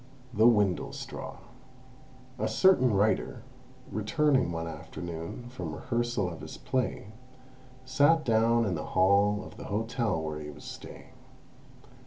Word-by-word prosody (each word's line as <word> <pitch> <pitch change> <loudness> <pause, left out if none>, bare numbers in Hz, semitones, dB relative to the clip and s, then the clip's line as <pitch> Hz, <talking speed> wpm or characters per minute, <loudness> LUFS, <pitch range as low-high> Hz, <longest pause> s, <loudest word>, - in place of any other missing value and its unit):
THE 110 +1 +5
WINDLESTRAW 105 -6 0 1.0
A - - 0
certain 185 -10 +4
writer, 105 +2 +1 0.5
returning 130 - +2
one 80 0 -3
afternoon 85 +6 -7
from 90 -11 -6
rehearsal 120 -4 -1
of 85 -2 -7
his - - -8
play, 125 -5 -2 0.7
sat 150 +4 +3
down 115 0 +3
in 95 - 0
the 75 - -3
hall 100 +2 +4
of - - -12
the - - -8
hotel 110 -2 -1
where 75 -1 -4
he 75 0 -7
was 75 - -11
staying. - - -10
105 Hz, 125 wpm, -29 LUFS, 90-120 Hz, 1.0 s, THE